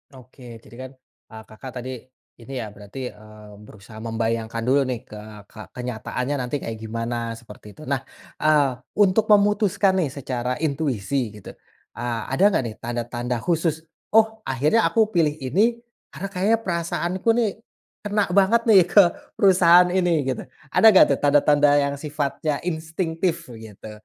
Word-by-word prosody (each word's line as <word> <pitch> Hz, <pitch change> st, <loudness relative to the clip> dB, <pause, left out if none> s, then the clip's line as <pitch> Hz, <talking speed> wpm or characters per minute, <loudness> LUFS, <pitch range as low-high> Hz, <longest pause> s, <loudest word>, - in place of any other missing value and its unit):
Oke 125 Hz, -1 st, -13 dB
jadi -, -, -15 dB
kan, -, -, -17 dB, 0.4 s
eee, 110 Hz, 0 st, -11 dB
Kakak 110 Hz, +5 st, -11 dB
tadi 125 Hz, +1 st, -5 dB, 0.5 s
ini 120 Hz, +4 st, -11 dB
ya 110 Hz, -2 st, -7 dB
berarti, 105 Hz, +5 st, -8 dB
eee, 105 Hz, 0 st, -15 dB
berusaha 105 Hz, +1 st, -14 dB
membayangkan 115 Hz, 0 st, -3 dB
dulu 135 Hz, +4 st, +3 dB
nih 125 Hz, -2 st, -3 dB
ke 105 Hz, -, -11 dB, 0.3 s
ke -, -, -14 dB, 0.2 s
kenyataannya 125 Hz, +2 st, -4 dB
nanti 125 Hz, +2 st, -3 dB
kayak 110 Hz, -1 st, -5 dB
gimana 115 Hz, +1 st, -4 dB
seperti 105 Hz, -2 st, -14 dB
itu. -, -, -15 dB
Nah, 140 Hz, -2 st, -1 dB, 0.4 s
eee, 150 Hz, -3 st, +3 dB, 0.3 s
untuk 205 Hz, +3 st, +2 dB
memutuskan 205 Hz, -2 st, +3 dB
nih 165 Hz, -, +1 dB
secara 125 Hz, -2 st, -4 dB
intuisi 135 Hz, -5 st, -2 dB
gitu, 105 Hz, -, -10 dB, 0.4 s
eee, 120 Hz, -1 st, -4 dB
ada 135 Hz, +8 st, +1 dB
nggak 195 Hz, -9 st, +1 dB
nih 110 Hz, -2 st, -6 dB
tanda-tanda 120 Hz, +1 st, -4 dB
khusus? 165 Hz, -2 st, -1 dB, 0.3 s
"Oh 220 Hz, 0 st, +4 dB
akhirnya 145 Hz, -, +2 dB
aku 220 Hz, -1 st, +1 dB
pilih 160 Hz, -5 st, +1 dB
ini 210 Hz, -, +2 dB, 0.3 s
karena 180 Hz, +8 st, -7 dB
kayaknya 200 Hz, +4 st, +1 dB
perasaanku 175 Hz, +1 st, -3 dB
nih 235 Hz, -3 st, +2 dB, 0.5 s
kena 210 Hz, 0 st, 0 dB
banget 200 Hz, +5 st, +4 dB
nih 220 Hz, -4 st, +6 dB
ke 205 Hz, -, +7 dB, 0.3 s
perusahaan 180 Hz, -2 st, +5 dB
ini," 175 Hz, -4 st, +1 dB
gitu. 130 Hz, -1 st, -3 dB, 0.3 s
Ada -, -, +3 dB
nggak 200 Hz, -4 st, +8 dB
tuh 140 Hz, -, 0 dB
tanda-tanda 145 Hz, 0 st, +4 dB
yang 140 Hz, 0 st, -2 dB
sifatnya 145 Hz, 0 st, -3 dB
instingtif 165 Hz, 0 st, -2 dB
begitu 110 Hz, -2 st, -11 dB
140 Hz, 150 wpm, -23 LUFS, 115-180 Hz, 0.5 s, nggak